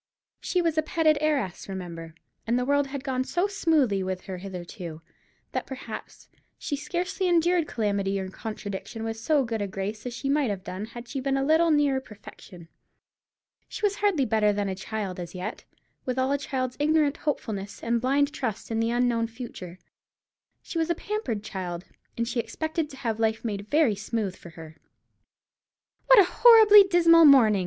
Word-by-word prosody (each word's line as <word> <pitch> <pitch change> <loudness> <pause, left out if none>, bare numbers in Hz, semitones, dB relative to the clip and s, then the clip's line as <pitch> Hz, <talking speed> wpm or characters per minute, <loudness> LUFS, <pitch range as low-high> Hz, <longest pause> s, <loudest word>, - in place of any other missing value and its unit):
She 360 -1 0
was 325 -2 +1
a - - +4
petted 310 -1 +2
heiress, 275 -13 -1
remember, 170 -4 -7 0.3
and 235 +2 +2
the 250 - 0
world 285 +1 +2
had 270 -1 -6
gone 260 -1 -1
so 350 +7 0
smoothly 310 - +1
with 185 0 -3
her 185 -2 -7
hitherto, 175 -3 -8 0.5
that - - -3
perhaps 265 0 -9 0.3
she 290 - -3
scarcely 355 +5 -2
endured 345 -1 +2
calamity 200 -3 -1
or 190 - -4
contradiction 215 +1 -6
with 225 0 -3
so 280 +5 +2
good 225 -3 -3
a 200 - -1
grace 200 +4 -5
as 240 - -5
she 275 - -4
might 280 -2 +2
have 195 -2 -4
done 190 +3 -5
had 240 +2 -10
she 275 - -4
been 270 +1 0
a 270 - 0
little 320 +3 +4
nearer 290 -3 +2
perfection. 200 -6 -13 1.0
She - - -8
was 405 0 0
hardly 390 -10 +2
better 215 -2 +2
than 205 0 -1
a 190 - -2
child 190 -1 -5
as 175 0 -7
yet, 185 +5 -6 0.4
with 255 0 -3
all 260 +1 +1
a 285 - +2
child's 255 -3 -3
ignorant 300 -1 +2
hopefulness 205 -9 -4
and 235 0 0
blind 280 +3 +1
trust 230 -7 -4
in 225 - 0
the 225 0 +1
unknown 240 -1 +1
future. 225 -7 -9 0.9
She 335 - -4
was 325 +1 0
a 340 - +1
pampered 320 - -3
child, 180 -3 -5 0.3
and 235 0 -1
she 245 0 -2
expected 315 +7 -3
to 270 - -11
have 225 -4 -3
life 220 +1 0
made 205 -2 -4
very 295 -7 +3
smooth 205 -1 -3
for 170 - -13
her. 160 -1 -12 1.3
"What - - +8
a 405 - +9
horribly 420 0 +8
dismal 335 -3 +6
morning!" 235 -8 +6
240 Hz, 180 wpm, -26 LUFS, 200-300 Hz, 1.3 s, a